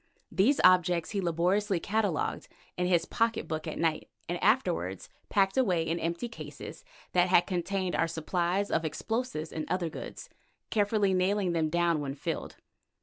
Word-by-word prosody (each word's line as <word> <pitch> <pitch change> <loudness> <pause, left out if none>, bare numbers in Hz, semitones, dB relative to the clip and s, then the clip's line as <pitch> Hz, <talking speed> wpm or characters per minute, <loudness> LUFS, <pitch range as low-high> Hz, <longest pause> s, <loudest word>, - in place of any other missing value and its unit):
These 260 +9 +3
objects 180 -2 +4
he 200 -2 -1
laboriously 180 +3 +1
catalogued 205 -3 -1 0.3
in 180 0 0
his 175 -2 +3
pocket 230 +3 0
book 155 +1 -4
at 155 - -4
night, 165 -2 0 0.2
and 175 0 -3
afterwards 180 - +1 0.2
packed 195 +1 +2
away 185 -10 +3
in 165 +1 -1
empty 170 +8 -2
cases 230 - -9 0.3
that 180 0 +3
had 180 -1 +5
contained 185 0 -1
our 165 - +2
supplies 175 +4 -1
of 165 - +1
explosive 210 0 -3
and 155 - -4
other 180 -2 0
goods, - - -8 0.4
carefully 205 -2 +2
nailing 185 0 +1
them 160 -2 +1
down 170 -1 +2
when 140 -1 -4
filled. 145 - -4
180 Hz, 155 wpm, -29 LUFS, 165-200 Hz, 0.4 s, had